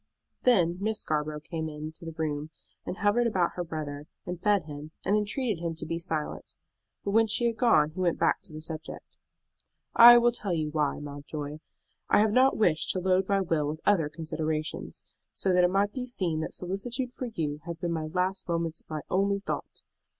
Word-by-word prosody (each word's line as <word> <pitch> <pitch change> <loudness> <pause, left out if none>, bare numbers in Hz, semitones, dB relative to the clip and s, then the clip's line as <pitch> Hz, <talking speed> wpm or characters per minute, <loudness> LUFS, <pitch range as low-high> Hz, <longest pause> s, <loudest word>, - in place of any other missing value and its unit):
Then 180 -8 +4
Miss 215 +1 0
Scarborough 150 0 -1
came 160 0 -4
into 155 +2 -8
the 165 -1 -7
room, 150 -1 -2 0.4
and 190 - -4
hovered 220 +4 +2
about 185 -6 +1
her 175 - -4
brother, 150 -3 -5 0.2
and 180 -1 -5
fed 205 -3 +3
him, 150 0 -8 0.2
and 200 - +3
entreated 210 -2 -1
him 165 -1 -2
to - - -4
be 165 0 -3
silent; 160 -3 -4 0.5
but 200 - 0
when 225 +2 +4
she 230 +3 +1
had 230 -1 +1
gone 155 -12 +4
he 170 - -9
went 175 -2 +1
back - - +2
to - - -9
the 155 0 -7
subject. 160 0 -6 0.9
"I 240 +1 +11
will 240 0 +4
tell 210 -6 -2
you 155 -2 -1
why, 150 -2 0
Mountjoy. 145 +1 -6 0.5
I - - +5
have 215 0 +4
not 260 +4 +4
wished 175 -8 +3
to 185 - -1
load 185 +1 +1
my 200 -1 +3
will 165 -5 0
with 155 +1 -4
other 170 -8 +3
considerations, 155 0 -3 0.3
so 190 - +2
that 180 0 +5
it 180 - +5
might 200 +2 +1
be 250 -1 -4
seen 180 -10 -1
that 160 - -4
solicitude 235 +8 -3
for 255 - -4
you 155 -10 -3
has 170 -1 -5
been 170 0 -2
in - - 0
my 160 -1 -2
last 185 +3 -1
moments 165 -1 -1
my 155 -1 -3
only 200 +1 +1
thought. - - -4
170 Hz, 200 wpm, -28 LUFS, 155-205 Hz, 0.9 s, I